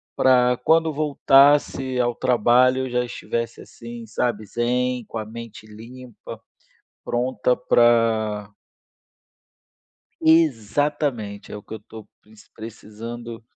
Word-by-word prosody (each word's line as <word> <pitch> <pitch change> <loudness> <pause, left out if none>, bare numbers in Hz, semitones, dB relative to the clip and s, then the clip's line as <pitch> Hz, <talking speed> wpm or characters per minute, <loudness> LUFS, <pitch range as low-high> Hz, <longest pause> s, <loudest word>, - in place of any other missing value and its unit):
para 125 -1 +3
quando 160 +4 +2
voltasse 140 -3 +3
ao 120 -1 +1
trabalho 125 +2 +3
eu - - -8
já 125 0 0
estivesse 115 -1 -5
assim, 115 0 -10
sabe, 110 -1 -2
zen, 125 +2 -1
com 115 - -8
a 110 - -4
mente 115 -1 -10
limpa, 120 +3 -12 0.7
pronta 125 0 0
para 115 -4 +2 1.7
exatamente, 145 -6 0
é - - -5
o 105 - -10
que - - -10
eu 110 - -7
estou 110 0 -13 0.5
precisando. 115 +2 -9
120 Hz, 105 wpm, -22 LUFS, 110-130 Hz, 1.7 s, para